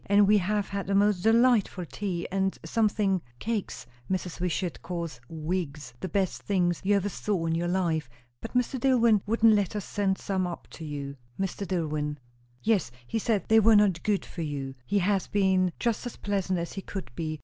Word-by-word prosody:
And 200 Hz, 0 st, +5 dB
we 210 Hz, 0 st, +6 dB
have 205 Hz, +2 st, -1 dB
had 200 Hz, -1 st, -3 dB
the 195 Hz, -, +1 dB
most 200 Hz, -2 st, +3 dB
delightful 225 Hz, -4 st, +3 dB
tea, 180 Hz, -1 st, -3 dB
and 190 Hz, 0 st, 0 dB
something 210 Hz, -4 st, +1 dB, 0.2 s
cakes 215 Hz, -, -3 dB, 0.2 s
Mrs. 180 Hz, -2 st, -3 dB
Wishart 180 Hz, 0 st, -2 dB
calls 170 Hz, -8 st, -5 dB
wigs, 155 Hz, -5 st, -3 dB
the 185 Hz, -, -4 dB
best 195 Hz, -3 st, 0 dB
things 175 Hz, -4 st, +1 dB
you 205 Hz, +2 st, +3 dB
ever 200 Hz, 0 st, +1 dB
saw 200 Hz, -3 st, -2 dB
in 165 Hz, -, 0 dB
your 170 Hz, +1 st, 0 dB
life; 170 Hz, -6 st, 0 dB, 0.3 s
but 225 Hz, -, -8 dB
Mr. 250 Hz, +1 st, +1 dB
Dillwyn 235 Hz, -5 st, +4 dB
wouldn't 225 Hz, 0 st, +5 dB
let 205 Hz, -2 st, +1 dB
us 205 Hz, -, -3 dB
send 195 Hz, -2 st, 0 dB
some 190 Hz, -2 st, -1 dB
up 175 Hz, -, -7 dB
to 165 Hz, -, -9 dB
you." 140 Hz, -2 st, -5 dB, 0.2 s
"Mr. 195 Hz, +1 st, -2 dB
Dillwyn!" 150 Hz, -4 st, -1 dB, 0.5 s
"Yes, 210 Hz, -, +2 dB, 0.2 s
he 225 Hz, -, -2 dB
said 215 Hz, -2 st, +1 dB
they 220 Hz, 0 st, +6 dB
were 220 Hz, +1 st, +6 dB
not 200 Hz, -5 st, +4 dB
good 205 Hz, -2 st, 0 dB
for 170 Hz, -, -7 dB
you. 140 Hz, -4 st, -3 dB
He 205 Hz, -, +1 dB
has 195 Hz, 0 st, +1 dB
been 190 Hz, -2 st, +2 dB
just 235 Hz, -2 st, 0 dB
as 245 Hz, -, -7 dB
pleasant 195 Hz, -2 st, -1 dB
as 170 Hz, 0 st, -4 dB
he 195 Hz, -, -5 dB
could 195 Hz, -5 st, -6 dB
be. 155 Hz, +1 st, -4 dB
190 Hz, 195 wpm, -28 LUFS, 170-205 Hz, 0.5 s, we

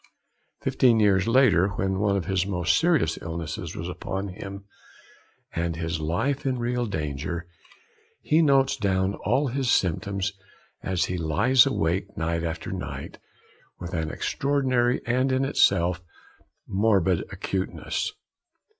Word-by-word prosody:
Fifteen 120 Hz, -3 st, +3 dB
years 100 Hz, -2 st, +3 dB
later, 115 Hz, -7 st, +4 dB
when 95 Hz, 0 st, -1 dB
one 100 Hz, -1 st, +2 dB
of 95 Hz, -, -3 dB
his 95 Hz, -1 st, 0 dB
most 90 Hz, -4 st, +1 dB
serious 165 Hz, -, +2 dB
illnesses 80 Hz, 0 st, -5 dB
was 85 Hz, -, -5 dB
upon 95 Hz, +2 st, -4 dB
him, 100 Hz, +1 st, -8 dB, 0.9 s
and 85 Hz, 0 st, -1 dB
his 80 Hz, -1 st, -3 dB
life 115 Hz, -, -1 dB
in 130 Hz, -2 st, 0 dB
real 120 Hz, 0 st, -1 dB
danger, 80 Hz, -1 st, -3 dB, 0.7 s
he 155 Hz, +2 st, +2 dB
notes 135 Hz, -4 st, +4 dB
down 95 Hz, -4 st, 0 dB
all 140 Hz, 0 st, +1 dB
his 130 Hz, 0 st, -1 dB
symptoms 100 Hz, +2 st, 0 dB, 0.5 s
as 90 Hz, -2 st, 0 dB
he 90 Hz, -1 st, -3 dB
lies 115 Hz, -, +4 dB
awake 95 Hz, -4 st, -1 dB
night 85 Hz, 0 st, -1 dB
after 80 Hz, -1 st, -4 dB
night, -, -, -6 dB, 0.6 s
with 90 Hz, 0 st, -7 dB
an 80 Hz, -2 st, -1 dB
extraordinary 130 Hz, -, 0 dB
and, 130 Hz, +3 st, +1 dB
in 130 Hz, +1 st, +1 dB
itself, 90 Hz, -, +2 dB, 0.6 s
morbid 95 Hz, -3 st, +2 dB
acuteness. 95 Hz, -1 st, -3 dB
95 Hz, 130 wpm, -25 LUFS, 85-125 Hz, 0.9 s, later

